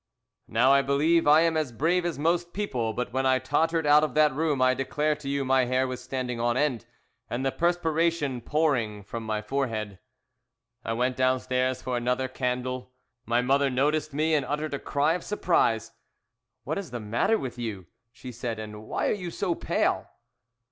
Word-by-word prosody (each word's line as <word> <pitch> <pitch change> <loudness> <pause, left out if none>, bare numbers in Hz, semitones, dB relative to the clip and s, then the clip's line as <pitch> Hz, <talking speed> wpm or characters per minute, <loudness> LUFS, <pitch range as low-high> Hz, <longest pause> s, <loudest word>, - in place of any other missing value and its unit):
"Now 125 +5 +4
I 140 - +5
believe 145 +4 +2
I 150 +2 +7
am 165 -1 +2
as 155 -5 -1
brave 170 +8 +1
as 165 -5 -3
most 170 +3 0
people, 125 - -2
but 125 +2 -4
when 130 0 +1
I 130 0 +4
tottered 160 +4 0
out 150 +1 +6
of 155 - -2
that 150 -2 +4
room 150 -1 0
I 130 0 +4
declare 150 +4 0
to 140 -2 -7
you 140 -1 -1
my 130 -1 +3
hair 130 +1 +1
was 130 -1 -5
standing 125 -2 -3
on 120 +1 +1
end 130 -5 0 0.4
and 125 +3 -2
the 135 - +1
perspiration 165 -5 0
pouring 120 -8 0
from 115 +4 -6
my 110 -1 -2
forehead. 110 -6 -3 0.8
"I 115 - -2
went 125 +2 0
downstairs 130 0 0
for 125 -1 -1
another 125 +2 0
candle. 125 0 -3 0.3
My 120 +1 +2
mother 140 +2 +2
noticed 150 +4 0
me, 155 +3 0
and 150 -3 +3
uttered 150 +3 -3
a 140 - -2
cry 145 +2 +1
of 180 - -4
surprise. 115 - +1 0.7
"'What - - -2
is 195 - -7
the 120 0 -5
matter 115 - +1
with 125 - -6
you,' 105 -6 -5 0.3
she 125 0 -10
said, 120 -1 -4
'and 110 0 -8
why - - -1
are - - +2
you 180 -4 -5
so 180 +1 -1
pale?' - - -1
130 Hz, 190 wpm, -27 LUFS, 120-155 Hz, 0.8 s, I